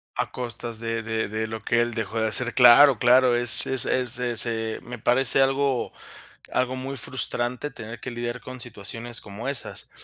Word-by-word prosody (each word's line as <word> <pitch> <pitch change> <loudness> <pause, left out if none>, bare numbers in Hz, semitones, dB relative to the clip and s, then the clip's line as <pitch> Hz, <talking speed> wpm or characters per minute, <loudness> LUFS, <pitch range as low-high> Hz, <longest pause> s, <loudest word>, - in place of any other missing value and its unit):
A - - -3
costas 120 -2 -6
de 115 0 -4
de 110 -1 -4
de 110 +1 -4
lo 110 0 -8
que 115 - 0
él 120 0 -3
dejó 110 0 -4
de 110 - 0
hacer. 125 +3 -3
Claro, 125 0 +6
claro, 125 0 +3
es 120 +1 +8
es 130 -2 +5
es 125 -1 -1
ese 115 -2 0
me 125 -1 -10
parece 130 +3 +2
algo 135 -1 -1 0.6
algo 130 0 -1
muy 135 +2 -7
frustrante 125 +2 -4
tener 115 -2 -10
que 130 - -8
lidiar 120 0 -6
con 130 0 -10
situaciones 120 0 -5
como 105 +5 -8
esas. 140 -3 -5
120 Hz, 180 wpm, -23 LUFS, 115-130 Hz, 0.6 s, es